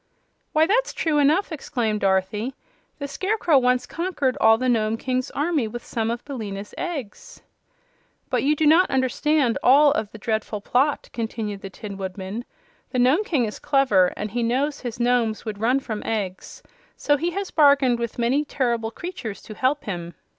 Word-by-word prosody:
"Why, 310 +1 +4
that's 470 +8 +1
true 310 -3 +1
enough!" 310 +7 +3
exclaimed 235 -8 -2
Dorothy. 200 +6 0 0.4
"The 280 - -4
Scarecrow 365 -2 +2
once 250 0 +2
conquered 325 -7 -1
all 225 0 +6
the 255 +2 -1
Nome 225 -2 +1
King's 255 +2 -2
army 295 -5 0
with 240 +2 -7
some 225 -1 -2
of 235 +1 -4
Billina's 210 -7 -6
eggs." 345 - -6 0.9
"But - - +2
you 295 +2 +2
do 310 - +1
not 325 +5 +5
understand 265 0 +1
all 285 +3 +6
of 225 -8 -2
the - - -10
dreadful 220 0 -2
plot," 265 +8 0
continued 220 -3 -4
the 195 - -7
Tin 200 +1 -8
Woodman. 190 +4 -5 0.4
"The 255 - -3
Nome 260 +11 +4
King 290 - +1
is 210 - -6
clever, 255 -10 +3
and 210 0 -4
he 240 +2 -1
knows 270 +5 0
his 240 -2 -6
Nomes 240 -3 +1
would 210 -2 -5
run 250 +4 +3
from 220 -5 -5
eggs; 200 -4 -4 0.3
so 290 - +2
he 330 +5 -1
has 395 -1 -3
bargained 280 -5 +4
with 235 -1 -4
many 250 +5 +2
terrible 235 -6 -1
creatures 290 - -6
to 215 - -9
help 265 +6 0
him. 175 -4 -5
245 Hz, 175 wpm, -23 LUFS, 220-290 Hz, 0.9 s, all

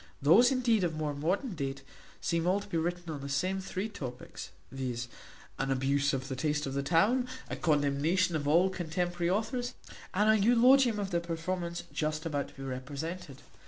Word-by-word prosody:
Those 195 - +6
indeed 240 -6 +2
of 165 -3 0
more 155 -1 -2
modern 185 - -1
date, 140 -3 -4 0.4
seem 170 0 0
all 190 +2 +3
to - - -9
be 165 - -2
written 175 0 -3
on 145 - -6
the 140 - -6
same 185 +7 0
three 190 +2 -3
topics, 130 - -7 0.2
viz., 125 -3 -3 0.5
an 135 - -1
abuse 140 +2 +2
of 130 -1 -3
the 130 - -3
taste 150 +2 0
of 135 - -4
the 140 - 0
town, 205 - +3 0.2
a - - -1
condemnation 155 +3 +2
of 145 -2 -1
all 175 +5 +4
contemporary 175 0 -1
authors, 245 +5 -1 0.4
and 210 +3 +3
an 220 -1 +5
eulogium 245 +1 +5
on 205 - 0
the 170 -2 +1
performance 170 +1 -3
just 155 +1 -2
about 145 -3 -1
to - - -17
be 135 - -8
represented. 140 +4 -6
165 Hz, 185 wpm, -31 LUFS, 140-190 Hz, 0.5 s, Those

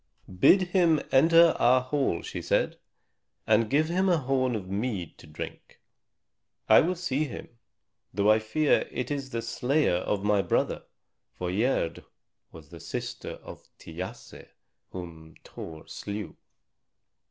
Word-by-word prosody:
"Bid 190 - +6
him 170 -4 +3
enter 165 +4 +6
our 130 +1 +5
hall," 130 - -1
she - - -6
said, - - 0 0.7
"and 110 0 +3
give 150 +4 +2
him 185 +3 +1
a 175 - +4
horn 130 -3 0
of 105 - -4
bright 95 +1 -3
mead 105 -9 -4
to - - -14
drink. 75 - -9 0.9
I - - +8
will 180 +3 0
see 155 -4 -1
him, 135 - -8 0.6
though 100 +2 +3
I 110 - +4
fear 145 +8 +1
it 125 - -4
is 140 -2 -3
the 115 -3 -4
slayer 125 - +1
of 100 +2 -2
my 105 -1 +3
brother." - - -1 0.5
For 90 -1 -3
Gerd 100 -5 0 0.5
was - - -14
the - - -11
sister - - -6
of - - -12
Thiasse 90 +3 -9 0.4
whom 80 -3 -10
Thor 80 -1 -10
slew. 100 -5 -6
125 Hz, 140 wpm, -27 LUFS, 95-150 Hz, 0.9 s, I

